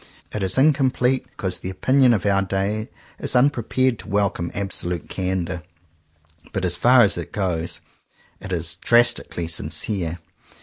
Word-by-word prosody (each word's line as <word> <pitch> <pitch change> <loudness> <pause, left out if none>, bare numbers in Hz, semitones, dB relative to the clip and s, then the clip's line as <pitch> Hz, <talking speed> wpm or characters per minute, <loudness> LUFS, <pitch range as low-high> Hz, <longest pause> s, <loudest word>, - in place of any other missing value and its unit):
It 105 - -4
is 95 +2 0
incomplete, 130 -3 +2
because 95 -6 -3
the 95 - -5
opinion 130 +6 +3
of 105 - -3
our 100 -1 +3
day 100 +4 -2 0.3
is - - -3
unprepared 130 -2 +2
to - - -9
welcome 100 -4 0
absolute 90 -4 -2
candor. 90 -2 -2 0.9
But 95 -2 -1
as 90 -1 0
far 120 +7 +6
as 100 - +2
it - - -7
goes, 90 -5 -2 0.6
it 95 - -8
is 85 -1 -2
drastical 120 0 +3
ly 85 - -1
sincere. 85 +2 -2
100 Hz, 145 wpm, -22 LUFS, 90-120 Hz, 0.9 s, far